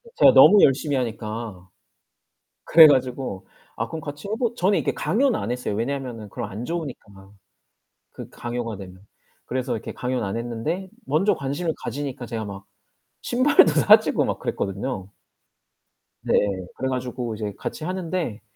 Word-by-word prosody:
제가 - - +6
너무 205 -1 +8
열심히 140 +1 +3
하니까. 110 -5 -4 1.0
그래 165 -1 +9
가지고 130 -7 0 0.3
"아, - - -3
그럼 160 - -6
같이 145 +3 -8
해보" 230 +2 -1
저는 195 +3 +2
이렇게 - - -1
강요는 250 +4 +1
안 100 - -4
했어요. 125 -4 -2
왜냐면은 120 -2 -4
그럼 120 -4 -5
안 105 +5 -6
좋으니까. 120 - -7 0.8
그 - - -10
강요가 120 -3 -5
되면. 95 0 -12 0.4
그래서 130 0 -2
이렇게 115 -1 -5
강요는 125 -1 -2
안 100 +2 -3
했는데 120 +11 -4 0.2
먼저 180 +8 +2
관심을 145 +5 -2
가지니까 135 0 -5
제가 110 -2 -4
막 100 -1 -8 0.6
신발도 245 - +4
사주고 210 +8 +5
막 - - -3
그랬거든요. 100 0 -4 1.1
네, - - -1 0.4
그래 130 - -2
가지고 125 -2 -3
이제 105 -1 -4
같이 - - -6
하는데 175 - -3
125 Hz, 325 characters per minute, -23 LUFS, 110-160 Hz, 1.1 s, 그래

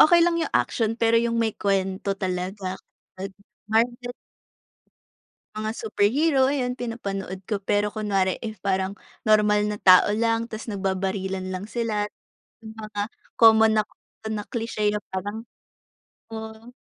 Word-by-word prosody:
okey 340 +2 +7
lang 345 -1 +2
yung 325 - -2
action 225 -2 +1
pero 230 0 +4
yung 235 0 0
may 225 -1 +1
kwento 195 0 -1
talaga, 185 +1 -3 0.4
'pag 190 +1 -5 0.4
marvel 240 +3 +1 1.5
mga 215 0 -2
superhero, 260 +7 +2
ayun, 255 -3 0
pinapanood 195 -6 -4
ko. 210 - +1
Pero 205 +1 +1
kunwari 200 -3 0
if 215 -4 -7
parang 190 -1 0 0.3
normal 210 -1 +4
na 210 0 -2
tao 185 +2 +7
lang 230 +1 +1
tapos 225 0 -7
nagbabarilan 190 -1 -2
lang 185 +1 -4
sila. 220 -2 -1 0.6
Yung 220 - -8
mga 215 -1 -5 0.4
common 220 -1 +7
na 215 - +4 0.5
na 210 -1 -3
cliche 225 -3 -1
na 210 - 0 0.2
parang 205 +4 -3 0.9
oo, 220 +1 -8
215 Hz, 130 wpm, -25 LUFS, 195-230 Hz, 1.5 s, okey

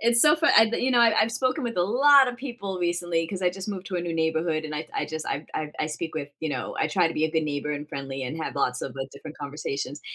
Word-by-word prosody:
It's 235 +1 +4
so 300 +1 +6
fun 330 +2 +3
I, 220 0 +7
the - - -1
you 255 +1 +1
know, 240 - +5
I 230 -1 +6
I've 230 - 0
spoken 255 +3 0
with 235 - -3
a 175 - +3
lotta 260 +4 +5
people 235 -8 -5
recently 175 -1 0
'cause 185 +2 -5
I 180 - +3
just 190 +2 -7
moved 195 -2 -5
to 185 - -3
a - - 0
new 170 -1 -3
neighborhood 160 0 0
and 155 - -5
I 150 +1 -4
I - - 0
just, 155 0 -5
I 145 +3 -3
I 150 -1 -3
I 155 - +1
speak 160 +1 -5
with, 145 -2 -3
you 160 - -3
know, - - -4
I - - +2
try 180 -4 +2
to 165 - -6
be 155 - +1
a 160 - 0
good 160 -1 +2
neighbor 150 0 -2
and 145 +1 -5
friendly 135 -1 -5
and 130 +6 -4
have - - -4
lots 125 0 0
of 135 - -5 0.2
different 150 +2 -10
conversations. 145 0 -5
165 Hz, 290 wpm, -26 LUFS, 150-225 Hz, 0.2 s, I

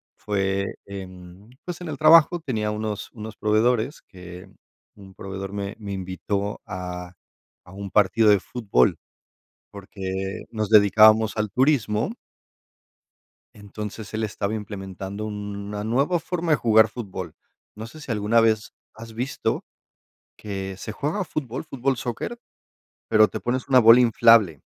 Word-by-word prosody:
fue 100 -1 -1 0.2
en, 95 +1 -10 0.2
pues, 180 0 -6
en 175 - -6
el - - -5
trabajo 165 +2 +6
tenía 110 -9 -2
unos 105 -1 -4
unos 110 -1 -8
proveedores 110 +6 +1
que, 90 -1 -12 0.5
un 95 -2 -15
proveedor 95 0 -7
me 100 +1 -4
me 100 -2 -7
invitó 100 +2 -4
a 90 -1 -6 0.5
a 90 - -16
un 100 0 -7
partido 105 +3 +3
de 105 -1 +5
fútbol, 100 - +1 0.8
porque 95 -1 -5
nos 110 -2 -3
dedicábamos 110 +1 +6
al 105 -1 -1
turismo. 125 - +1 1.4
Entonces, 105 +1 -8
él 110 0 -1
estaba 105 0 -3
implementando 100 -1 -6
una 105 0 -5
nueva 140 +10 +1
forma 175 -1 -3
de 150 - +4
jugar 110 -1 +4
fútbol. 95 -7 -7 0.4
No 110 +2 -8
sé 155 +6 -13
si 135 - -6
alguna 110 +2 +2
vez 110 -1 +1 0.2
has 115 +1 -11
visto 125 +5 -2 0.7
que 95 -2 -6
se 105 - -7
juega 155 - -2
fútbol, 130 -5 -5
fútbol 135 -3 -1
soccer, 125 - -5 0.7
pero 110 -1 +5
te - - -5
pones 125 +2 -3
una 130 - +6
bola 115 +1 +8
inflable. 115 - +5
105 Hz, 135 wpm, -24 LUFS, 100-115 Hz, 1.4 s, bola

